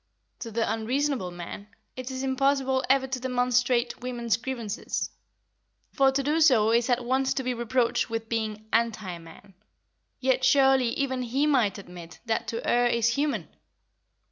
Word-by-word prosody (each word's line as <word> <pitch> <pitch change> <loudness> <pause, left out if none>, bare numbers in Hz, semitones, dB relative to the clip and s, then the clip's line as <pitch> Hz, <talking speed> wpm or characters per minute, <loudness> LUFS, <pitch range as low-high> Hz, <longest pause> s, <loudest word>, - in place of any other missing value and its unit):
To 230 - -6
the 225 +1 -1
unreasonable 250 -1 -1
man, 175 +4 -8 0.3
it 255 0 -6
is 260 0 -4
impossible 265 0 +1
ever 270 0 +4
to 260 -1 -4
demonstrate 245 -1 +1
women's 240 -2 -1
grievances, 235 -4 -4 0.8
for 270 -1 +4
to 275 +1 -1
do 305 +4 +1
so 235 -8 +5
is 235 +2 +2
at 245 0 +1
once 265 +2 +1
to 265 - -1
be 255 0 -1
reproached 240 0 0
with 225 0 -4
being 220 -1 -3
"anti 220 -6 0
man"; 165 +4 -15 0.7
yet 260 0 +1
surely 265 -2 +4
even 260 -2 -1
he 255 +4 0
might 245 -10 +2
admit 175 -4 -11
that 225 -1 -1
to 230 - -4
err 245 0 +3
is 235 -1 +2
human. 285 +4 -1
245 Hz, 155 wpm, -27 LUFS, 225-265 Hz, 0.8 s, so